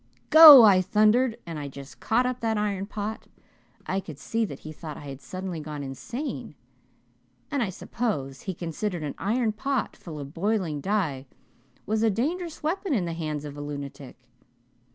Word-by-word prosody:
'Go,' 310 -5 +12
I 195 -4 +6
thundered, 220 +5 +3
and 165 -3 -6
I 145 - -5
just 140 0 -11
caught 245 +3 +1
up 250 0 -2
that 225 -1 0
iron 200 -2 -2
pot. 215 +1 -5 0.6
I 190 - -1
could 165 -7 -9
see 225 +8 -1
that 140 -9 -8
he 155 - -8
thought 155 0 -8
I - - -10
had 135 -1 -8
suddenly 185 -2 -6
gone 150 -1 -6
insane, 235 - -6 1.0
and 285 -3 0
I 220 - 0
suppose 185 - -4
he 190 -2 -5
considered 175 +1 -4
an 145 - -4
iron 225 +3 0
pot 270 +4 -2
full 160 -4 -9
of 140 0 -8
boiling 180 -5 -1
dye 155 -9 -1 0.6
was 215 +1 0
a 225 - +4
dangerous 315 - -3
weapon 340 0 -1
in 190 -6 0
the 170 - -3
hands 155 -3 -4
of 145 -1 -7
a 145 - -7
lunatic. 140 -2 -7
190 Hz, 175 wpm, -26 LUFS, 150-225 Hz, 1.0 s, Go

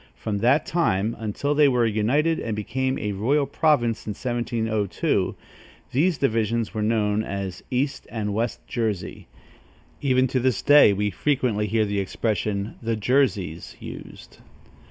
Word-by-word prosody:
From 100 - -3
that 130 +8 +3
time, 115 - 0
until 115 +7 -1
they 145 0 +5
were 125 -3 +3
united 125 +10 +1
and 110 -2 -3
became 130 +5 -2
a 105 - -2
royal 130 +9 +1
province 135 -6 +1
in 105 - -2
1702, 115 -3 -1 0.6
these 160 +5 +2
divisions 115 -3 0
were 110 - -2
known 105 -1 +1
as 100 -3 -5
East 135 +3 -2
and 105 -3 -3
West 115 +3 -2
Jersey. 110 -6 -3 0.7
Even 130 -2 +3
to 130 0 0
this 125 -3 0
day, 145 -7 +7
we 105 +1 0
frequently 120 -3 0
hear 110 +1 +1
the 100 -1 -1
expression, 100 +1 -2
"The 115 -1 -1
Jerseys," 105 - 0
used. - - -10
115 Hz, 140 wpm, -24 LUFS, 105-130 Hz, 0.7 s, day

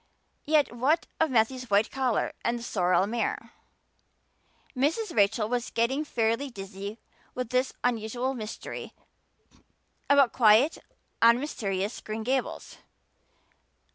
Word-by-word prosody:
Yet 300 -4 +3
what 285 +7 +2
of 320 - +3
Matthew's 250 +1 +1
white 205 +2 +3
collar 260 -4 0
and 235 +1 0
the 235 - -8
sorrel 180 -5 +2
mare? 230 +3 -3 1.2
Mrs. 315 - 0
Rachel 210 +1 +3
was 245 +1 -2
getting 260 +6 0
fairly 230 0 0
dizzy 195 -1 -7 0.4
with 250 -2 -3
this 255 +1 +1
unusual 245 +2 -1
mystery 220 -4 -7 1.2
about 280 -3 +5
quiet, 230 +6 +5 0.4
unmysterious 230 -5 +1
Green 220 +1 -5
Gables. 260 +2 -2
235 Hz, 110 wpm, -27 LUFS, 215-265 Hz, 1.2 s, about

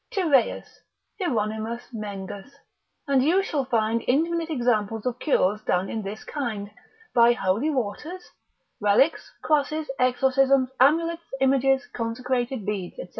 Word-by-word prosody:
9. 355 -5 +1
Tyreus, 250 -4 +1 0.4
Hieronymus 225 - -2
Mengus, 205 +1 -7 0.5
and 275 -2 +3
you 360 +7 +3
shall 295 -8 -2
find 230 -2 0
infinite 330 +5 +1
examples 225 -6 0
of 250 0 -2
cures 210 - +1
done 185 -2 0
in 220 - -3
this 205 +2 -7
kind, 220 -8 -4 0.4
by 235 0 +6
holy 225 +5 0
waters, 300 - -4 0.5
relics, 210 +9 +2
crosses, 305 0 0
exorcisms, 260 +1 +3
amulets, 330 +5 +3 0.2
images, 270 0 +3
consecrated 245 0 -2
beads, 195 -4 -4
&c. - - -6
250 Hz, 125 wpm, -25 LUFS, 215-280 Hz, 0.5 s, by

